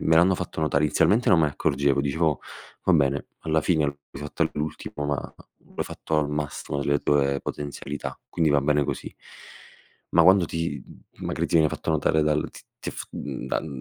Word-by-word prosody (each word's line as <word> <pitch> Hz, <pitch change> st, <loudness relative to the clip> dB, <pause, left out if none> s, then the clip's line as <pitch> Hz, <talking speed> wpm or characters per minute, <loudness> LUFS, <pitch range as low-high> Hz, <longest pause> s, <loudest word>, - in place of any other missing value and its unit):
me 80 Hz, -, +3 dB
l'hanno 90 Hz, +3 st, +5 dB
fatto 80 Hz, -, -4 dB
notare, 75 Hz, -1 st, +2 dB
inizialmente 105 Hz, -, +3 dB
non -, -, +6 dB
me 80 Hz, -, +5 dB
ne 75 Hz, -, 0 dB
accorgevo, 70 Hz, -2 st, +1 dB
dicevo: 75 Hz, +2 st, +1 dB, 0.4 s
"Va 95 Hz, -, +4 dB
bene, 70 Hz, -2 st, +2 dB
alla 80 Hz, 0 st, +1 dB
fine 80 Hz, -2 st, +2 dB
l'hai 70 Hz, 0 st, -6 dB
fatto 75 Hz, -, -2 dB
all'ultimo 75 Hz, -1 st, -3 dB
ma 75 Hz, -1 st, -3 dB, 0.4 s
l'ho -, -, -1 dB
fatto 80 Hz, -1 st, -2 dB
al 75 Hz, -1 st, 0 dB
massimo 75 Hz, -1 st, -3 dB
delle 70 Hz, 0 st, +2 dB
tue 70 Hz, -1 st, +2 dB
potenzialità, 75 Hz, 0 st, -5 dB
quindi 80 Hz, -2 st, +1 dB
va 70 Hz, -1 st, +4 dB
bene 75 Hz, +1 st, +2 dB
così". -, -, -4 dB, 1.0 s
Ma 85 Hz, -, +5 dB
quando 95 Hz, +1 st, +6 dB
ti 80 Hz, -5 st, -3 dB
m -, -, -14 dB
magari -, -, -1 dB
ti -, -, -3 dB
viene 80 Hz, -2 st, +6 dB
fatto -, -, -3 dB
notare 80 Hz, 0 st, +2 dB
dal 75 Hz, 0 st, +1 dB
t -, -, -12 dB, 0.2 s
t -, -, -4 dB
f -, -, -6 dB
mhmm, 65 Hz, -3 st, -5 dB
dal 65 Hz, -, -1 dB
75 Hz, 190 wpm, -25 LUFS, 70-80 Hz, 1.0 s, non